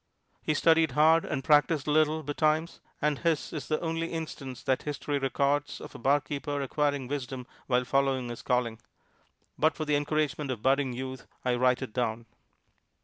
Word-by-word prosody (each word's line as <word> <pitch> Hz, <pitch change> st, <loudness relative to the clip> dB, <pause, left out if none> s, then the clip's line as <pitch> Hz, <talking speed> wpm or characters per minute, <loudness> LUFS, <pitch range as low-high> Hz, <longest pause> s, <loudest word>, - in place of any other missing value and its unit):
He 155 Hz, -, 0 dB
studied 160 Hz, -2 st, +4 dB
hard 160 Hz, +3 st, +5 dB
and 135 Hz, -, -3 dB
practised 150 Hz, 0 st, +3 dB
a 150 Hz, -, 0 dB
little 155 Hz, +1 st, +3 dB
betimes 155 Hz, +3 st, 0 dB, 0.2 s
and 150 Hz, -2 st, +1 dB
his 165 Hz, -4 st, 0 dB
is 150 Hz, -5 st, -5 dB
the 155 Hz, -, 0 dB
only 165 Hz, 0 st, -1 dB
instance 135 Hz, -6 st, -6 dB
that 130 Hz, -, +1 dB
history 145 Hz, -1 st, -2 dB
records 140 Hz, +2 st, 0 dB
of -, -, -10 dB
a -, -, -9 dB
barkeeper 145 Hz, +2 st, 0 dB
acquiring 140 Hz, -1 st, 0 dB
wisdom 130 Hz, -2 st, -4 dB, 0.2 s
while 125 Hz, -1 st, +2 dB
following 135 Hz, -1 st, +1 dB
his 120 Hz, -, -6 dB
calling; 125 Hz, -3 st, 0 dB, 0.8 s
but 155 Hz, +1 st, +3 dB
for 155 Hz, -, -3 dB
the 150 Hz, -1 st, +2 dB
encouragement 150 Hz, 0 st, 0 dB
of 120 Hz, -5 st, -4 dB
budding 135 Hz, -1 st, +2 dB
youth 130 Hz, +1 st, -6 dB, 0.2 s
I 125 Hz, -, +2 dB
write 125 Hz, +1 st, +2 dB
it 125 Hz, -, -7 dB
down. 115 Hz, -2 st, -1 dB
145 Hz, 170 wpm, -29 LUFS, 130-155 Hz, 0.8 s, hard